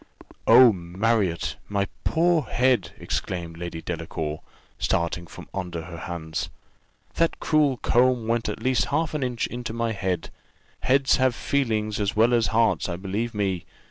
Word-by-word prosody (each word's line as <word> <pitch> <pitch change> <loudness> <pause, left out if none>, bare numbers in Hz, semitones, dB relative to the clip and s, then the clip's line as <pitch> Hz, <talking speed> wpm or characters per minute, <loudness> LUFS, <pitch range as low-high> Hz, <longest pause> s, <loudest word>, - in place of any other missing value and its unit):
"Oh, 120 0 +8
Marriott! 95 +1 0
my 100 -1 0 0.2
poor 170 0 +3
head!" 125 -4 +1
exclaimed 85 -3 -3
Lady 85 -2 -5
Delacour, 75 -1 -4 0.4
starting 85 +1 0
from - - -11
under 90 -4 -4
her 85 -3 -8
hands: 80 -1 -4 0.7
"that 165 0 +1
cruel 150 -4 +2
comb 125 -1 +2
went 115 0 0
at - - -5
least 125 -6 +2
half 160 +2 -1
an 150 - -2
inch 125 -3 -1
into 120 -2 -5
my 115 0 -1
head 95 -5 -2 0.5
heads 135 +1 +3
have 130 -2 +2
feeling 115 -7 0
as 105 -1 -1
well 115 +3 +4
as 115 -2 +3
hearts, 115 0 +2
believe 100 +6 -3
me." 95 -4 -1
110 Hz, 145 wpm, -25 LUFS, 90-125 Hz, 0.7 s, Oh